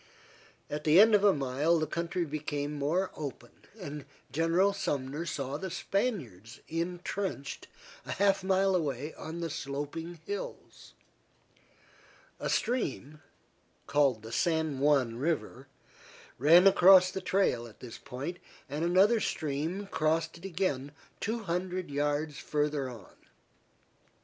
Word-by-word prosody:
At 150 +1 -4
the 155 +4 +6
end 220 +2 +7
of 205 -1 +5
a 205 - +7
mile 145 +3 +1
the 155 - 0
country 170 +3 -2
became 150 -1 -3
more 155 +7 0
open, 135 -5 -7 0.3
and 150 -5 -6 0.3
General 165 +6 +2
Sumner 145 -3 -3
saw 140 -2 -3
the 190 +4 -5
Spaniards 175 - -3
intrenched 175 -1 -4 0.4
a - - -2
half 195 -1 +2
mile 190 0 +3
away 150 -3 -2
on 165 +2 -7
the 165 - -2
sloping 150 +3 -5
hills. 205 0 -7 1.5
A - - -2
stream, 155 - -1 0.6
called 140 -6 +2
the 110 - -8
San 160 +1 0
Juan 135 -5 +2
River, 135 -2 -2 0.7
ran 165 +7 +7
across 185 -1 +7
the 190 - -4
trail 180 -12 +1
at 110 - -16
this 120 -3 -9
point, 145 +8 -6 0.3
and 150 +3 -3
another 190 +7 +4
stream 160 +3 -2
crossed 160 -2 0
it 170 +3 -12
again 155 -7 -2 0.3
two 225 +2 -2
hundred 180 -2 -3
yards 145 +1 -1
farther 150 -2 -1
on. 115 -6 -12
160 Hz, 125 wpm, -30 LUFS, 140-185 Hz, 1.5 s, end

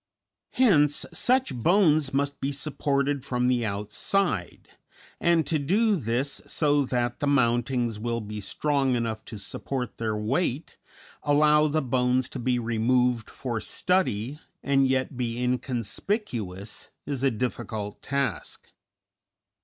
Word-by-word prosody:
Hence 150 - +4
such 260 +1 +2
bones 155 - +3
must 140 +1 -1
be 135 +1 -1
supported 140 -1 -1
from 125 -1 0
the 125 -2 +2
outside, 105 - -1 0.5
and 170 -2 +3
to 155 - 0
do 205 +9 +2
this 130 - -2
so 145 -2 +2
that 120 -1 -1
the 145 - 0
mountings 120 -3 +1
will 115 +1 -2
be 105 -1 -6
strong 135 +5 0
enough 115 -2 -2
to 110 - -7
support 125 +4 -5
their 110 -2 -1
weight, 135 +7 -1 0.5
allow 150 +1 +4
the 155 0 0
bones 125 0 +1
to 130 - -6
be 125 0 +1
removed 120 +1 +1
for 120 -4 -4
study, 150 - 0 0.2
and 135 -1 +3
yet 130 0 0
be 120 -2 -2
inconspicuous, 120 - -3 0.2
is 140 -3 -3
a 135 - +4
difficult 110 -3 -4
task. 140 0 -3
130 Hz, 125 wpm, -26 LUFS, 115-145 Hz, 0.5 s, Hence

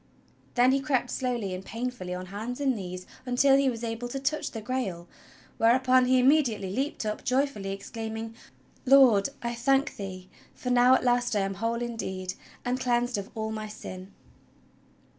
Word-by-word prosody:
Then 250 +1 +5
he 275 - +3
crept 265 -3 0
slowly 240 -7 -2
and 185 +1 -5
painfully 230 -4 -5
on 185 0 -6
hands 220 +7 -5
and 270 -3 +1
knees 185 -2 -6 0.2
until 260 +2 +4
he 275 -1 +3
was 235 -2 -5
able 230 +1 -3
to 270 +3 -4
touch 305 +3 -1
the 225 - -6
Grail, 210 -7 -3 0.5
whereupon 255 +2 +4
he 255 +1 +4
immediately 250 -8 +3
leaped 270 -1 -2
up 210 0 -3
joyfully 255 -6 0
exclaiming: 225 +2 -5 0.5
"Lord, 255 -7 +6
I 235 0 -1
thank 270 +4 +1
thee, 185 -2 -7 0.3
for 250 - -3
now 250 +1 +6
at - - 0
last 245 -2 +2
I 205 - +2
am 195 0 -1
whole 230 +4 -2
indeed, 190 -6 -4 0.3
and 250 +1 0
cleansed 245 -3 +1
of 200 - -7
all 220 0 -3
my 215 0 -4
sin!" 185 -2 -9
240 Hz, 170 wpm, -28 LUFS, 205-255 Hz, 0.5 s, Lord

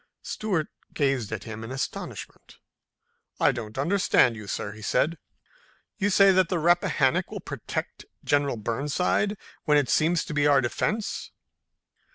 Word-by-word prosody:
Stuart 185 -8 -2 0.3
gazed 135 -7 0
at 110 -2 -4
him 110 0 -7
in 115 - -7
astonishment. 130 - -6 0.8
"I - - +5
don't 110 -1 -7
understand 155 - +3
you, 105 -2 -9
sir," 100 - -3
he 110 +1 -12
said. 160 +9 0 0.8
"You 205 0 +2
say 195 0 +6
that 185 -2 +3
the 180 - 0
Rappahannock 165 -5 +2
will - - -6
protect - - -5 0.2
General 145 -3 +1
Burnside 150 - 0 0.3
when 150 -3 +4
it 145 -4 +1
seems 165 +2 +2
to - - -6
be 145 0 +3
our 140 -2 +5
defense." 205 - -2
145 Hz, 145 wpm, -26 LUFS, 120-175 Hz, 0.8 s, say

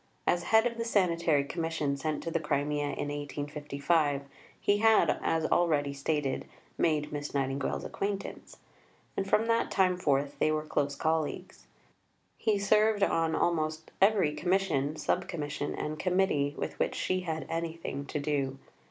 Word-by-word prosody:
As 175 0 +1
head 220 +4 +5
of 235 -1 -1
the - - 0
Sanitary 170 -9 +2
Commission 160 -2 -2
sent 150 +2 -3
to 165 - -3
the 165 - +1
Crimea 145 -1 0
in 145 0 -3
1855, 145 0 -1 0.4
he 205 0 +2
had, 220 0 +4
as 160 -1 +1
already 150 -5 +2
stated, 140 -1 -1 0.3
made 150 -2 +1
Miss 145 0 -5
Nightingale's 135 0 -1
acquaintance, 200 0 -4 0.6
and 195 0 -2
from 220 - +3
that 230 0 +1
time 185 -2 +2
forth 145 -4 0
they 155 - +3
were 155 0 -1
close 145 -2 -1
colleagues. 160 0 -2 0.7
He 215 -2 +1
served 210 +1 +3
on 165 -4 +2
almost 155 -2 0
every 195 -7 +4
Commission, 175 -5 0
Sub 180 +4 -1
Commission, 145 -3 -3
and 155 0 -4
Committee 180 -6 +1
with - - -4
which - - 0
she 185 - 0
had 160 -3 -3
anything 165 -4 -4
to 150 - -3
do. 140 -2 -1
155 Hz, 150 wpm, -30 LUFS, 145-185 Hz, 0.7 s, head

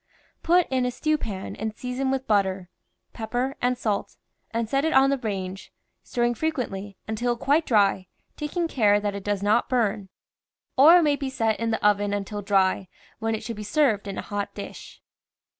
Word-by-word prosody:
Put 350 +1 +3
in 260 -1 +1
a 250 - +1
stew 310 +5 0
pan 195 -6 -5
and 220 +1 -4
season 250 +2 -3
with 265 0 -1
butter, 190 -4 0 0.4
pep 220 -1 -6
per 250 +3 -1
and 250 0 +1
salt, 210 -4 -2 0.3
and 230 0 -2
set 275 +5 +1
it 320 - +1
on 270 +1 +5
the 275 - +1
range, 195 -4 -5 0.3
stirring 240 0 0
fre 315 +7 -1
quently, 205 -10 -4
until 240 +2 -1
quite 295 +6 +2
dry, 200 -4 +3 0.3
taking 330 +3 -2
care 210 -8 +3
that 205 -1 -2
it 200 -1 -6
does 205 -1 -1
not 215 +5 +2
burn. 215 -6 0 0.7
Or 315 +7 +8
it 350 - +4
may 290 -2 +2
be 275 -2 -3
set 225 -4 0
in 230 0 -1
the 220 -2 -1
oven 205 0 +2
until 205 +1 -4
dry, 195 -1 +2 0.3
when 225 0 0
it 220 - -6
should 230 -1 -5
be - - -6
served 215 -3 +1
in 195 - -5
a - - -4
hot 205 -1 -4
dish. - - -9
225 Hz, 195 wpm, -25 LUFS, 205-265 Hz, 0.7 s, Or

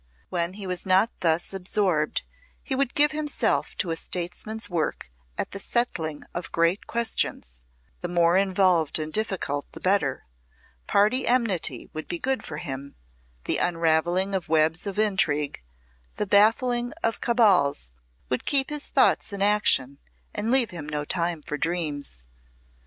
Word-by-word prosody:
When 170 0 -1
he 200 0 -8
was 180 -1 -2
not 190 +5 +3
thus 165 +2 +1
absorbed 185 -4 0 0.4
he 275 - -4
would 265 -1 -1
give 295 0 +4
himself 305 -1 0
to 175 - -1
a - - 0
statesman's 180 +7 -2
work 160 - -3 0.3
at - - -3
the 200 - -4
settling 165 -10 -1
of 175 - -5
great 170 +4 +1
questions 140 - -1 0.4
the 175 - -4
more 175 0 +3
involved 185 -4 +2
and 155 -1 -4
difficult 190 -10 -1
the - - -9
better; 185 -8 0 0.6
party 215 +6 +2
enmity 205 - +1
would 155 - -6
be 175 - -3
good 265 +8 -1
for 150 - -6
him, 140 -1 -6 0.5
the - - +1
unravelling 175 +3 +1
of 185 -4 -2
webs 160 +4 +2
of 200 - -4
intrigue, 165 - +1 0.5
the 210 - -2
baffling 240 +5 +3
of 225 - -1
cabals 185 - +3 0.4
would 125 - -2
keep 275 0 +1
his 295 -1 0
thoughts - - +2
in 200 -1 -2
action, 170 -10 +3 0.3
and 220 - -2
leave 250 -3 +3
him 155 -4 -7
no 150 -1 -3
time 170 -2 -2
for 150 +1 -4
dreams. 150 - -2
180 Hz, 150 wpm, -25 LUFS, 155-215 Hz, 0.6 s, give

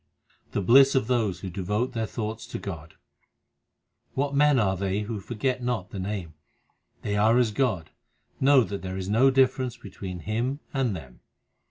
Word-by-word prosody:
The 100 - 0
bliss 135 +6 +6
of 130 - +2
those 110 -7 0
who 95 - -5
devote 105 +8 -2
their 115 -2 -2
thoughts 110 0 -5
to - - -5
Godr 85 -5 -7 1.2
What 140 +1 0
men 145 0 +4
are 95 -5 +2
they 95 +2 -1
who 105 0 -4
forget 125 +5 -2
not 120 -6 -2
the 100 - -5
Name? 95 -4 -4 0.7
They 105 - -1
are 110 +3 +4
as 120 -3 +3
God; 105 -9 -1 0.5
know 135 -1 +6
that 100 -1 -5
there 95 0 -5
is 95 0 -4
no 120 +6 +5
difference 130 -2 +2
be 100 - -11
tween 90 -2 -7
Him 120 - -2
and 130 -7 0
them. 65 -7 -10
110 Hz, 175 wpm, -26 LUFS, 95-130 Hz, 1.2 s, bliss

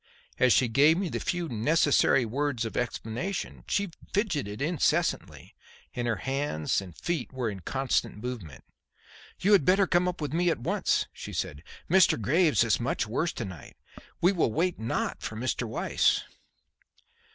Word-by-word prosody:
As 130 - +5
she 125 - +4
gave 145 +8 +4
me 190 -2 -1
the - - -3
few 175 -1 -2
necessary 135 +1 +3
words 130 0 -1
of 115 - -6
explanation, 120 - -3
she 200 -3 0 0.2
fidgeted 150 - -1
incessantly 155 +1 -1 0.4
and 120 -1 -2
her 115 - +1
hands 135 - -1
and 90 -4 -11
feet 170 -7 -3
were 125 -4 -2
in 100 - -7
constant 130 +4 -1
movement. 105 - -7 0.8
"You 200 - +3
had 200 -7 +6
better 190 +5 +4
come 180 0 +2
up 180 0 -3
with 150 -1 -4
me 175 +1 +2
at 165 - +1
once," 120 - 0
she - - -8
said. 70 - -3 0.3
"Mr. 185 -7 +4
Graves 155 - +3
is 115 - +1
much 120 -1 -1
worse 155 +10 -1
to - - -4
night. 90 -7 -10 0.4
We 180 - +5
will 170 - +1
wait 175 +7 0
not 110 +1 -2
for 110 - -5
Mr. 120 +1 -2
Weiss." 110 - +1
135 Hz, 165 wpm, -28 LUFS, 115-175 Hz, 0.8 s, had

